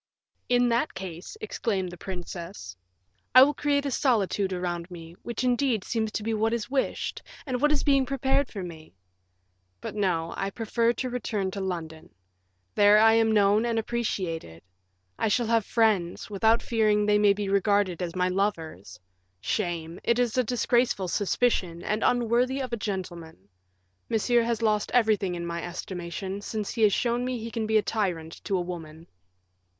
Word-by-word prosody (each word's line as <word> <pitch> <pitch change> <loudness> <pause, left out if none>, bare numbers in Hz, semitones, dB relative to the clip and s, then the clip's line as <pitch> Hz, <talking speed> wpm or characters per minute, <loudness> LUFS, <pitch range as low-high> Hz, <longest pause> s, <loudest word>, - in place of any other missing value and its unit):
"In 245 0 +4
that 235 +6 0
case," 185 - -7
exclaimed 200 - -2
the - - -8
princess, 175 - -7 0.6
"I 255 - +11
will 290 +2 +3
create 285 0 0
a 280 - -1
solitude 210 -7 +1
around 175 -1 -3
me, 165 -2 -10
which 235 +1 -4
indeed 245 -4 +1
seems 220 -2 -2
to 210 - -3
be 225 +1 -1
what 220 +1 +1
is 235 +1 -5
wished, 275 -1 -1 0.2
and 255 -3 -2
what 295 0 +4
is 300 - +1
being 275 -3 +3
prepared 270 0 +1
for 195 -4 -5
me. 160 - -10 0.8
But - - -6
no, 175 -5 -1
I 195 - -2
prefer 230 +2 0
to 255 +1 -3
return 210 -6 -2
to 195 - -5
London. 165 -4 -5 0.6
There 205 0 +6
I 225 +1 +6
am 225 0 +3
known 205 0 +4
and 235 -1 0
appreciated. 185 - -3 0.6
I - - +1
shall 235 +3 +1
have 225 -2 +1
friends, 215 -5 +1
without 220 +3 +2
fearing 215 -2 +2
they 210 0 +3
may 205 -1 +5
be 205 0 -4
regarded 200 -2 +1
as 175 0 -4
my 180 0 +1
lovers. 180 - -3 0.4
Shame! 170 - -3
it 235 - +2
is 245 -2 +1
a 255 - +3
disgraceful 240 -4 +1
suspicion, 185 -4 0
and 215 +1 -1
unworthy 245 +2 +2
a 260 - -2
gentleman. 180 - -5 0.6
Monsieur 235 +2 +2
has 230 -1 -1
lost 210 -1 +1
everything 215 -6 +2
in 170 0 -4
my 170 0 -4
estimation, 180 +2 -5
since 210 0 -4
he 230 - -4
has 210 -2 +6
shown 240 +4 0
me 255 0 -2
he 230 0 -6
can 225 -2 -2
be 220 0 +3
a 210 - +2
tyrant 175 -7 -3
to 195 - 0
a - - 0
woman." 165 -2 -7
210 Hz, 170 wpm, -27 LUFS, 180-235 Hz, 0.8 s, I